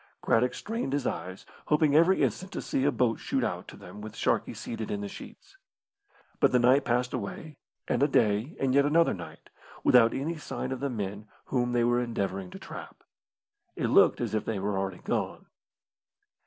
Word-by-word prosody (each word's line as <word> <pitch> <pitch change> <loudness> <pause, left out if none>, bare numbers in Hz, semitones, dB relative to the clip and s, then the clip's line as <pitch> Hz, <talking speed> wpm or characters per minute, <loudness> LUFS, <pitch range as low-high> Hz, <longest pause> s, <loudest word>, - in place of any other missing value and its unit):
Craddock 125 +2 +2
strained 225 - -3
his 140 -2 -1
eyes, 95 +1 -4 0.2
hoping 150 -1 +3
every 170 +4 +5
instant 185 +1 -1
to - - -3
see 135 - 0
a 145 - +4
boat 120 -5 +1
shoot - - -1
out - - -3
to - - -11
them 95 +4 -11
with 110 +1 -8
Sharkey - - 0
seated 110 -2 -5
in 100 - -2
the 100 - -4
sheets. 390 - -12 0.8
But - - +4
the 125 - +4
night 130 +3 +4
passed 125 +1 0
away, 130 +7 -6 0.3
and - - 0
a 145 - +5
day 110 +2 +1
and 135 -1 +1
yet 140 +1 +5
another 165 +3 +3
night, 90 -3 -10 0.3
without 115 -2 +5
any 155 +5 -2
sign 140 -3 -5
of 130 - -3
the 140 +1 -1
men 105 -2 -5 0.2
whom 125 -2 0
they 120 -1 +3
were 120 +1 +3
endeavouring 100 -5 -3
to - - -9
trap. - - -10 0.7
It - - -1
looked - - +5
as - - -2
if 110 - 0
they 110 - -2
were 100 +1 -1
already 95 -2 -3
gone. - - -2
125 Hz, 195 wpm, -28 LUFS, 105-140 Hz, 0.8 s, every